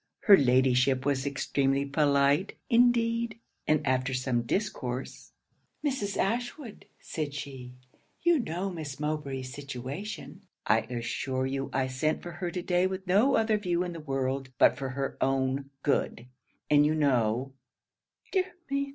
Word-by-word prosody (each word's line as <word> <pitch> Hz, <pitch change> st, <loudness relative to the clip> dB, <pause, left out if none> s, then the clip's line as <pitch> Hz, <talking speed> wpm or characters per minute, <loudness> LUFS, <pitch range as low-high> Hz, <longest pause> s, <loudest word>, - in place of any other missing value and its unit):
Her 205 Hz, -, +8 dB
Ladyship 130 Hz, -1 st, +3 dB
was 140 Hz, -1 st, 0 dB
extremely 140 Hz, 0 st, 0 dB
polite, 140 Hz, +4 st, +2 dB
indeed; 230 Hz, -1 st, +3 dB, 0.3 s
and 155 Hz, -1 st, +2 dB
after 130 Hz, 0 st, +1 dB
some 125 Hz, -2 st, 0 dB
discourse, 130 Hz, -, -3 dB, 0.5 s
"Mrs. 235 Hz, -8 st, -1 dB
Ashwood," 240 Hz, +3 st, -2 dB
said 150 Hz, -3 st, -4 dB
she, 130 Hz, -4 st, -7 dB, 0.5 s
"you 345 Hz, -2 st, +4 dB
know 190 Hz, -3 st, -3 dB
Miss 150 Hz, -6 st, -6 dB
Mowbray's 140 Hz, -4 st, -3 dB
situation: 145 Hz, -, -6 dB, 0.2 s
I 110 Hz, +2 st, +4 dB
assure 130 Hz, +2 st, -2 dB
you 135 Hz, +1 st, -2 dB
I 135 Hz, -1 st, +1 dB
sent 130 Hz, +4 st, -1 dB
for 175 Hz, -, -6 dB
her 175 Hz, +1 st, -4 dB
to 180 Hz, 0 st, -4 dB
day 180 Hz, +1 st, +2 dB
with 190 Hz, 0 st, -5 dB
no 205 Hz, +9 st, +4 dB
other 220 Hz, -1 st, +2 dB
view 180 Hz, -3 st, 0 dB
in 175 Hz, -1 st, -4 dB
the 165 Hz, -, -7 dB
world 135 Hz, -2 st, -2 dB
but -, -, +5 dB
for 135 Hz, -1 st, -4 dB
her 135 Hz, +1 st, -3 dB
own 135 Hz, +1 st, 0 dB
good, 130 Hz, -4 st, 0 dB, 0.4 s
and 145 Hz, -1 st, +5 dB
you 150 Hz, +1 st, +2 dB
know, 130 Hz, -3 st, +1 dB, 0.8 s
[_dear 375 Hz, -2 st, +3 dB, 0.3 s
me! 280 Hz, 0 st, 0 dB
145 Hz, 145 wpm, -29 LUFS, 130-190 Hz, 0.8 s, Her